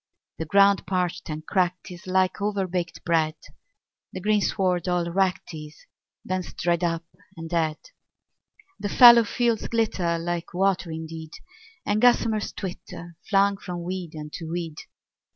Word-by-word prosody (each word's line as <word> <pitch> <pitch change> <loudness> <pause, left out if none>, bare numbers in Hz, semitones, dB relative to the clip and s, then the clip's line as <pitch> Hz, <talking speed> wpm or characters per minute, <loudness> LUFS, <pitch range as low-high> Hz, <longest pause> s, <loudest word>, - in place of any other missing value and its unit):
The 160 - -3
ground 200 +2 +4
parched 180 -2 -2
and 155 0 -5
cracked 180 -1 -1
is 180 +2 -11
like 185 +1 +1
overbaked 185 -4 -2
bread, 160 -2 +2 0.8
The - - -6
greensward 190 -3 +1
all 175 -1 0
wracked 185 -1 0
is, 150 -1 -10 0.4
bents 185 -1 -3
dried 170 +1 0
up 165 -1 -1 0.3
and 165 0 -6
dead. 160 -2 0 1.0
The 205 - -3
fallow 235 +2 +9
fields 235 0 0
glitter 195 -7 0
like 175 +1 -4
water 190 -2 +1
indeed, 160 0 -7 0.5
And 205 +1 +1
gossamers 230 -3 +3
twitter, 175 -2 -8
flung 200 0 +3
from 175 -3 -6
weed 180 -2 -5
unto 155 +2 -7
weed. 165 -2 -4
180 Hz, 135 wpm, -25 LUFS, 165-195 Hz, 1.0 s, fallow